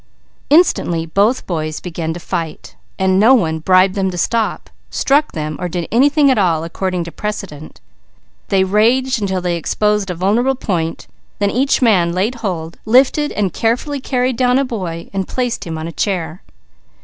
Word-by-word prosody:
Instantly 230 - +3
both 205 +9 +1
boys 155 -3 -3
began 165 -2 -4
to 170 - -5
fight. 165 -3 -5 0.2
No 190 +7 +5
one 160 -8 0
bribed 185 +3 +4
them 190 -1 0
to 180 - -6
stop, 225 +5 -1 0.2
struck 290 +3 +1
them, 155 -1 -4
or 180 0 -3
did 175 -1 -3
anything 280 +4 +4
at 255 - +2
all 165 -5 +1
according 180 +1 -3
to 170 - -8
precedent. 195 -8 -6 0.7
They 190 -1 +2
raged 230 +6 +2
until 190 -2 -1
they 175 -1 -1
exposed 210 +4 0
a 180 - -3
vulnerable 220 +9 +1
point, 170 -10 -3 0.3
then 200 -1 0
each 270 +2 +1
man 180 -7 +3
laid 195 +7 0
hold, 170 -5 -4
lifted 270 +5 +3
and 195 -5 -1
carefully 250 +5 -1
carried 255 -2 -1
down 250 0 +3
a 275 - +1
boy, 180 -9 -5 0.2
placing 240 -8 -3
him 160 - -4
on 160 +1 -5
a - - -6
chair. 175 -3 -3
195 Hz, 165 wpm, -17 LUFS, 170-245 Hz, 0.7 s, No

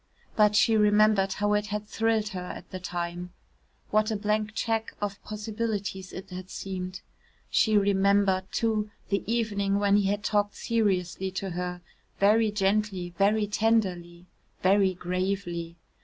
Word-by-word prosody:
But 210 -1 +4
she 225 +1 +4
remembered 210 -2 +4
how 205 0 0
it 210 0 +1
had 210 0 -3
thrilled 225 -1 0
her 190 - -5
at 180 - -8
the 185 - -5
time 175 0 -5 0.6
what 215 +1 +3
a 220 - -1
blank 215 +1 -1
cheque 225 -1 -1
of 205 -1 -4
possibilities 210 -3 -4
it 185 - -9
had 185 +1 -7
seemed. 185 -1 -5 0.5
She 215 -2 +4
remembered, 200 -1 +2
too, 215 -2 0 0.2
the 200 -1 0
evening 200 -4 0
when 205 0 +3
he 200 -1 +2
had 205 +1 -1
talked 205 -1 +1
seriously 190 -5 0
to 190 0 -3
her 180 0 -4 0.4
very 215 +2 +4
gently, 195 -3 0
very 210 +2 +3
tenderly, 190 -5 0 0.4
very 190 0 +4
gravely. 180 -2 -3
200 Hz, 140 wpm, -27 LUFS, 185-215 Hz, 0.6 s, But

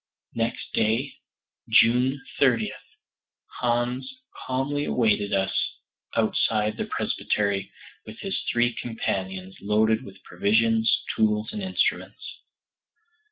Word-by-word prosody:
Next 115 0 -3
day, 115 +6 +1 0.6
June 125 +4 +4 0.2
23d, - - +3 0.9
Hans 125 - 0 0.4
calmly 135 +3 0
awaited 105 -4 +1
us 95 -1 +1 0.6
outside 110 -1 +1
the - - -2
presbytery 100 -2 -1 0.4
with 110 +1 -9
his 195 - -2
three 120 0 +2
companions 95 -5 -4
loaded 110 +2 +2
with - - -13
provisions, 115 +1 +2
tools, 105 0 +1
and 210 - -4
instruments. 190 -1 -2
115 Hz, 95 wpm, -26 LUFS, 105-125 Hz, 0.9 s, June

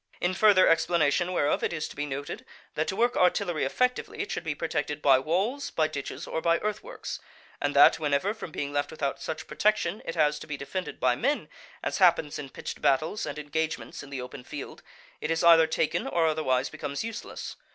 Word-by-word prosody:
In 180 +1 +1
further 195 -1 +6
explanation 165 +1 +2
whereof 145 -5 +1
it - - +1
is 155 -2 -3
to - - -11
be 145 0 -3
noted, 140 +1 -5 0.3
that 155 - -1
to 190 - -2
work 240 +3 +2
artillery 180 -3 +2
effectively 250 - 0
it - - -3
should - - -3
be - - -2
protected 150 0 -2
by 135 -3 +5
walls, 195 - -1
by 155 -1 +1
ditches, 145 -3 -6
or 160 - -3
by 170 0 +3
earth 210 0 -2
works; - - -6 0.4
and - - 0
that - - +7
whenever, 150 +6 +1
from 220 - -8
being 145 -2 -4
left 145 0 0
without 140 -3 -3
such 160 - -4
protection 210 -2 0
it 165 - -5
has 150 -2 +2
to - - -10
be 150 -2 -4
defended 180 +7 -5
by 125 -1 +3
men, 280 - -1 0.3
as - - -2
happens 170 -5 +3
in 140 - -6
pitched - - -7
battles 155 +8 +1
and 145 - -5
engagements 150 -5 -3
in 145 - -11
the 135 -2 -4
open 125 +1 -8
field, 145 +2 -8 0.4
it 155 - -2
is 165 +1 +1
either 165 -1 +7
taken 160 0 0
or 170 -1 +2
otherwise 150 -5 +1
becomes 140 +3 -4
useless. 225 -1 -6
160 Hz, 205 wpm, -28 LUFS, 145-180 Hz, 0.4 s, that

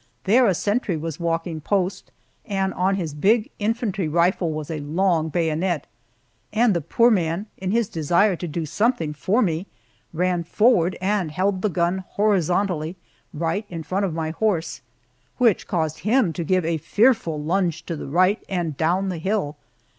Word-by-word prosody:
There 235 +5 +4
a 190 - +2
sentry 205 -2 0
was 160 0 -5
walking 165 -1 -2
post, 190 +2 -1 0.3
and 195 -2 -1
on 190 +2 +1
his 165 -6 -3
big 210 +9 +2
infantry 210 -4 -1
rifle 170 +2 +1
was 155 0 -5
a 155 - -3
long 160 +2 +1
bayonet, 165 +1 0 0.7
and 225 0 +3
the 170 - 0
poor 235 +10 +3
man, 175 -1 0
in 185 - -3
his 230 +1 +1
desire 175 +5 +2
to 175 - -5
do 160 +1 -3
something 205 - 0
for 190 - +1
me, 170 0 -1 0.4
ran 175 +1 0
forward 185 -1 +3
and 190 -3 0
held 185 +4 0
the 210 - +1
gun 175 +2 0
horizontally 180 -4 +1 0.4
right 170 +6 -2
in 165 -2 -6
front 190 +5 -1
of 195 - 0
my 160 -1 -2
horse, 170 -2 -1 0.6
which 235 -6 +2
caused 160 -3 -1
him 215 - +2
to 170 - -3
give 185 +1 +1
a 165 0 0
fearful 200 - +2
lunge 170 +2 -1
to 170 - -3
the 145 - -7
right 185 +8 +2
and 170 -6 -2
down 180 +4 +1
the 175 -3 -4
hill. 190 -5 -1
180 Hz, 170 wpm, -23 LUFS, 160-200 Hz, 0.7 s, There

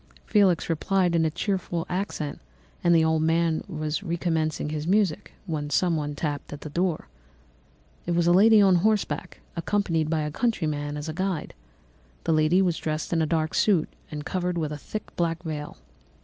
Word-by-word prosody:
Felix 195 -6 +3
replied 175 +2 +1
in 165 -1 +3
a - - +2
cheerful 175 0 -2
accent, 180 -5 -3 0.4
and 170 -1 +5
the 160 -1 +5
old 160 -1 +2
man 165 0 +2
was 155 -4 -3
recommencing 160 -3 -1
his 155 +1 -3
music 195 -4 +1
when 155 -5 -3
someone 155 -3 +1
tapped 145 -1 -3
at 145 - -7
the 150 - -7
door. 175 0 -1 1.0
"It 175 - +1
was 170 0 +2
a 175 - +5
lady 215 +4 +7
on 190 -2 +5
horseback, 205 -1 0
accompanied 170 -3 0
by 160 -1 +1
a 150 0 -2
country 225 -1 0
man 145 -1 -2
as 150 +2 -5
a 155 - -3
guide. 185 -1 -2 0.7
The 165 - +1
lady 155 +5 +4
was 175 -3 +1
dressed 155 +2 -3
in 165 - +2
a 160 - +1
dark 160 0 0
suit 190 -7 +3 0.2
and 150 -1 -6
covered 180 -2 -1
with 155 -2 -1
a 150 - -4
thick 215 +8 -7
black 170 0 -1
veil. 150 -3 -5
165 Hz, 180 wpm, -26 LUFS, 155-180 Hz, 1.0 s, lady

